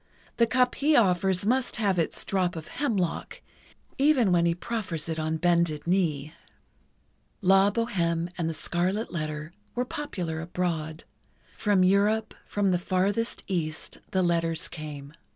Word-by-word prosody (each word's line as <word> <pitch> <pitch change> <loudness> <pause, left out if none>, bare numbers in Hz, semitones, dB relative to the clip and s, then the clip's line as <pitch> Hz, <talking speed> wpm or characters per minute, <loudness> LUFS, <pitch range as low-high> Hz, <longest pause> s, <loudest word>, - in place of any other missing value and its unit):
The 235 - +4
cup 250 +2 +3
he 300 +2 +2
offers 190 -3 +3
must 255 +3 +1
have 200 -5 +1
its 165 - -2
drop 185 -3 0
of 160 -1 -7
hemlock, 215 - -2 0.6
even 270 -8 +4
when 170 -1 +4
he 170 - +1
proffers 180 -6 -3
it 160 -1 -2
on 160 0 -1
bended 170 -3 +1
knee." 160 -5 0 1.1
"La 195 +1 +5
Bohême" 175 -7 -1
and 165 -2 -1
"The 165 - -4
Scarlet 185 +8 -1
Letter" 155 0 -4 0.2
were 245 +1 0
popular 180 - -4
abroad. 165 -2 -3 0.5
From 205 -3 +3
Europe, 210 +4 +3
from 200 -2 +1
the 180 - +2
farthest 195 +6 0
East, 160 -5 -3
the 190 -1 +1
letters 165 -2 +1
came. 150 -2 -8
180 Hz, 140 wpm, -27 LUFS, 165-205 Hz, 1.1 s, La